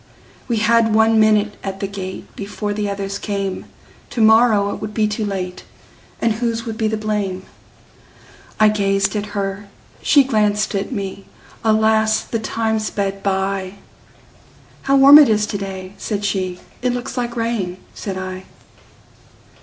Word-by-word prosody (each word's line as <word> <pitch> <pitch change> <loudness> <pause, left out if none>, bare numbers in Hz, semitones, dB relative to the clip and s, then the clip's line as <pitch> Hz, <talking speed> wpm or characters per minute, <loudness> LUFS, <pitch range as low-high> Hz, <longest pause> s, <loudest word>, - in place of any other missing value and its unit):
We 235 -3 0
had 225 0 +3
one 220 0 +4
minute 215 -1 +3
at 195 -1 -5
the 195 - -2
gate, 195 -1 -7
Before 205 +1 -4
the 205 0 -2
others 200 0 -4
came; 195 -2 -3 0.4
To - - -5
morrow 220 -2 +5
it - - -8
would 210 0 -6
be 215 -1 +2
too 210 +1 -3
late, 185 -3 -4 0.6
And 230 - +1
whose 230 0 -2
would 225 -2 -4
be 220 -1 0
the 220 0 -1
blame!I 210 +1 -4
gazed 195 -1 +1
at 210 0 -2
her, 195 +1 -3 0.3
she 285 -2 +5
glanced 210 -4 +1
at 200 +3 -2
me; 195 -4 -5 0.4
Alas! 220 0 +3
the 230 - -4
time 220 0 -1
sped 200 -2 -3
by:"How 195 +7 -5
warm 275 +2 +9
it 290 - +6
is 210 -1 +2
to 205 - -4
day!" 190 -1 -6
said 205 -2 -3
she;"It 195 +5 -3
looks 245 +1 -5
like 240 -2 -3
rain," 230 -6 -2 0.2
said 195 -2 -5
I. 185 0 -6
210 Hz, 145 wpm, -19 LUFS, 195-220 Hz, 0.6 s, warm